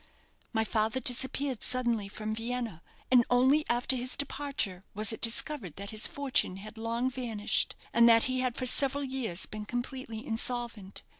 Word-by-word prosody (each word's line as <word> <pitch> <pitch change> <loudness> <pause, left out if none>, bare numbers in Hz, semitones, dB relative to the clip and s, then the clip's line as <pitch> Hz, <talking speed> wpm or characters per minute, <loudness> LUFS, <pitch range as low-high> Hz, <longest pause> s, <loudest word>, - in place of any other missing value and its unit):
My 220 -2 +1
father 220 +2 0
disappeared 265 0 -1
suddenly 240 -5 -1
from 215 +2 -5
Vienna, 230 -5 -4 0.3
and 250 -2 +6
only 260 +5 +4
after 240 +2 +3
his 250 0 -1
departure 275 -10 -3
was 215 +1 +3
it - - -8
discovered 230 - 0
that 200 +2 -7
his 215 0 +2
fortune 275 -9 0
had 215 +3 -10
long 230 +2 -1
vanished, 230 -5 -1 0.2
and 235 0 +6
that 230 -1 +6
he 255 0 0
had 255 -2 -1
for 255 - -3
several 275 +2 +5
years 255 -9 -1
been 215 -1 -7
completely 245 -1 -5
insolvent. 230 -4 -2
240 Hz, 160 wpm, -30 LUFS, 215-255 Hz, 0.3 s, and